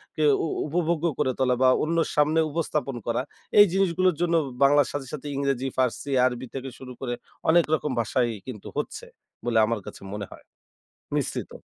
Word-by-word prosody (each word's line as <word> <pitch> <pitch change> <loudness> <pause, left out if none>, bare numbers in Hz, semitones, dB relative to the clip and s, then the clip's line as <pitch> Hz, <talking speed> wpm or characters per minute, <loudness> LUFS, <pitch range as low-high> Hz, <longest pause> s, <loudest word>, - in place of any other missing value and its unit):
কে 155 - 0 0.2
উ - - -1 0.2
উপভোগ্য 170 +1 0
করে 130 - +2
তোলা 125 -1 +3
বা, 130 - +6 0.2
অন্যর 165 +1 +1
সামনে 150 +2 +3
উপস্থাপন 150 -4 -2
করা। 120 +2 +1 0.4
এই 205 - +11
জিনিসগুলোর 185 -2 +2
জন্য 170 -1 +2 0.3
বাংলার 145 +1 +5
সাথে, 140 -3 -4
সাথে 150 -1 -6
ইংরেজি, 135 -2 0
ফার্সি, 130 +2 0
আরবি 130 0 -1
থেকে 135 0 -4
শুরু 130 -1 -9
করে 120 -2 -2 0.4
অনেক 170 +1 +5
রকম 150 -2 0
ভাষাই 120 +2 +1 0.2
কিন্তু 115 -6 -7
হচ্ছে - - -4 0.4
বলে 115 -2 +1
আমার 115 -1 -1
কাছে - - -9
মনে 105 -1 -4
হয়। - - -12 0.7
মিশ্রিত। - - -3
140 Hz, 170 wpm, -26 LUFS, 125-160 Hz, 0.7 s, এই